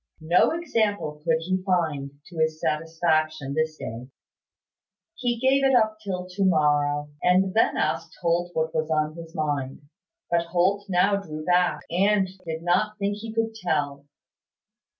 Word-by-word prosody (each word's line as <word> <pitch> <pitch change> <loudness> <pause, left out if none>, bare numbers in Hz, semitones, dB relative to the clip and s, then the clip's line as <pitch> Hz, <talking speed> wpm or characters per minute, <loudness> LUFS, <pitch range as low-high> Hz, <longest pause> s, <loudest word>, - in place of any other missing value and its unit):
No 170 +3 +4
example 215 - -1
could 160 -1 +1
he 185 +2 -1
find, 165 -7 0 0.2
to 170 -2 -9
his 160 0 +1
satisfaction, 155 -2 0
this 155 +1 -1
day. 120 +3 -7 1.0
He 245 -2 -1
gave 265 +3 +3
it 270 -1 +4
up 215 -2 +2
till 185 -4 -4
to 190 +2 -2
morrow, 145 -4 +2
and 185 +1 +3
then 225 - +3
asked 165 0 -2
Holt 175 0 +1
what 160 0 0
was 155 0 -1
on 155 -1 +1
his 165 -1 -10
mind. 145 -3 -2 0.5
But 170 0 +1
Holt 190 +4 +1
now 190 +2 +3
drew 155 -6 -7
back, 175 -4 +2
and 195 +2 +3 0.2
did 160 0 -4
not 200 +5 +1
think 205 0 -1
he 220 +1 -7
could 225 0 -1
tell. 145 -8 -2
170 Hz, 150 wpm, -25 LUFS, 155-200 Hz, 1.0 s, No